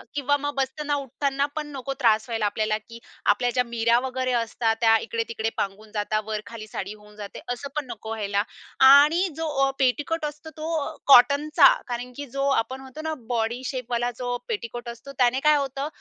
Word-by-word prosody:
किंवा 285 0 +2
मग 290 0 -3
बसताना, 290 +2 -1
उठताना 275 +1 -1
पण 300 -1 -3
नको 270 +1 -4
त्रास 220 -3 +3
व्हायला 225 -2 -1
आपल्याला 215 +1 0
की 230 0 -11 0.3
आपल्या 245 +4 -1
ज्या 250 -1 +2
नीऱ्या 235 0 +2
वगैरे 255 0 -2
असतात 230 -1 0
त्या 225 -1 +6
इकडे-तिकडे 225 -1 -2
पांगून 205 +2 -4
जातात, 215 0 0
वर 215 -1 -3
खाली 220 -1 -8
साडी 200 0 -5
होऊन 210 0 -17
जाते. 205 -1 -8
असं 275 +3 -7
पण 300 -2 -1
नको 220 0 -8
व्हायला. 205 -2 -1 0.5
आणि 300 +7 +7
जो 325 - -2 0.2
ओ - - +1
पेटीकोट 295 +5 +1
असतो 300 +2 -7
तो 315 +2 -4
अ, - - -5
कॉटनचा, 285 +3 +7 0.2
कारण 245 +1 -4
की 285 - -5
जो 275 - +1
आपण 265 0 0
म्हणतो 265 +3 -9
ना - - -1 0.2
बॉडीशेपवाला 245 +1 -1
जो 245 -1 -2
पेटीकोट 240 - -4
असतो 235 +4 -9
त्याने 250 0 +3
काय 300 - +6
होतं, 275 +1 -2
245 Hz, 185 wpm, -25 LUFS, 225-280 Hz, 0.5 s, आणि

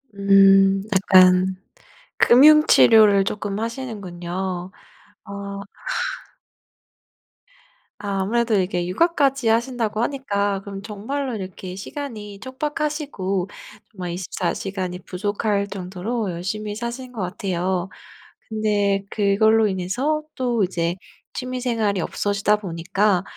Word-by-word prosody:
음. 195 0 +5
약간 185 -1 +5 0.6
금융 305 +5 +7
치료를 210 -3 +6
쪼끔 205 0 -3
하시는군요. 190 -6 -5 0.5
어. 200 -1 -6 2.4
아 200 -2 -3
아무래도 230 +3 +1
이게 180 -2 -1
육아까지 275 - +1
하신다고 230 -1 0
하니까 205 -7 -1
그럼 195 -1 -7
정말로 235 +6 -4
이렇게 185 -1 -7
시간이 210 -3 -7
촉박하시고 265 - -3 0.4
정말 180 -3 -6
24 175 0 -3
시간이 185 -2 -4
부족할 200 +2 -2
정도로 195 +3 -4
열심히 205 +5 -4
사시는 240 +3 -6
것 225 - -7
같아요. 185 -1 -2 0.6
근데 205 -2 0
그걸로 220 +2 +3
인해서 210 +12 -1
또 240 -5 0
이제 175 -1 -1 0.4
취미 255 0 -4
생활이 225 -5 0
없어지다 205 +3 0
보니까 185 +1 0
200 Hz, 240 characters per minute, -22 LUFS, 190-230 Hz, 2.4 s, 금융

